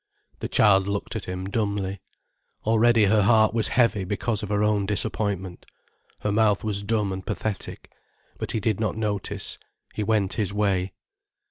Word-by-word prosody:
The - - -4
child 95 -2 +4
looked 100 +3 -3
at 110 - -4
him 90 +1 -5
dumbly. 100 -2 -2 0.6
Already 115 0 +4
her 105 +2 +4
heart 110 +1 +4
was 115 -2 +1
heavy 115 -5 +3
because 105 +3 -2
of 105 - -5
her 105 0 +1
own 105 -2 +1
disappointment. 100 -3 -2 0.5
Her 105 - 0
mouth 105 -1 +2
was 105 -2 -1
dumb 105 -2 0
and 95 0 -6
pathetic. 105 0 -4 0.5
But - - -4
he 110 - 0
did 110 -1 0
not 110 -1 -1
notice, 105 -3 -3 0.3
he - - -3
went 105 -2 +1
his 100 -4 -1
way. 100 -3 0
105 Hz, 160 wpm, -25 LUFS, 100-110 Hz, 0.6 s, child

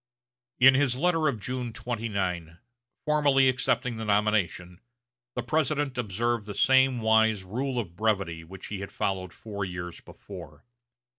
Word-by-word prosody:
In 130 +1 +8
his 130 -2 +2
letter 165 +2 +2
of 120 -7 -1
June 125 +1 -4
29, 100 -9 -3 0.5
formally 145 -3 +4
accepting 125 -1 0
the 110 - -4
nomination, 100 -4 0 0.5
the 125 - -2
President 145 0 0
observed 115 0 -1
the 105 - -6
same 130 -2 +4
wise 110 -2 +3
rule 125 +7 -3
of 100 -8 -3
brevity 95 -6 -1
which 95 +3 -11
he 105 - -4
had 100 - -6
followed 95 -2 -2
four 100 +1 -6
years 90 -2 -6
before. - - -12
110 Hz, 140 wpm, -27 LUFS, 95-130 Hz, 0.5 s, In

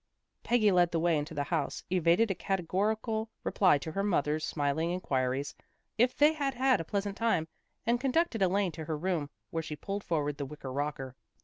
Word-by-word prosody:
Peggy 220 -4 +3
led 175 -2 +4
the 170 - 0
way 170 0 +3
into 150 +2 -3
the 145 - 0
house, - - -2
evaded 185 +4 +3
a - - +2
categorical 210 +5 -1
reply 185 -7 +4
to 160 +3 -6
her 195 - -1
mother's 155 -6 +1
smiling 145 +2 0
inquiries 135 -6 -1 0.4
if 245 +3 +2
they 300 +2 +6
had 280 -4 -2
had 260 -4 +3
a - - -4
pleasant 200 +3 -2
time, 220 -9 +1 0.4
and 240 +1 +1
conducted 270 -3 +1
Elaine 190 0 +2
to 160 0 -7
her 155 0 -2
room, 165 -3 -1 0.2
where 165 - -1
she 160 -1 -6
pulled 200 +6 -5
forward 150 -3 -1
the 140 - -2
wicker 140 -2 -7
rocker. 135 -2 -3
175 Hz, 190 wpm, -30 LUFS, 150-215 Hz, 0.4 s, they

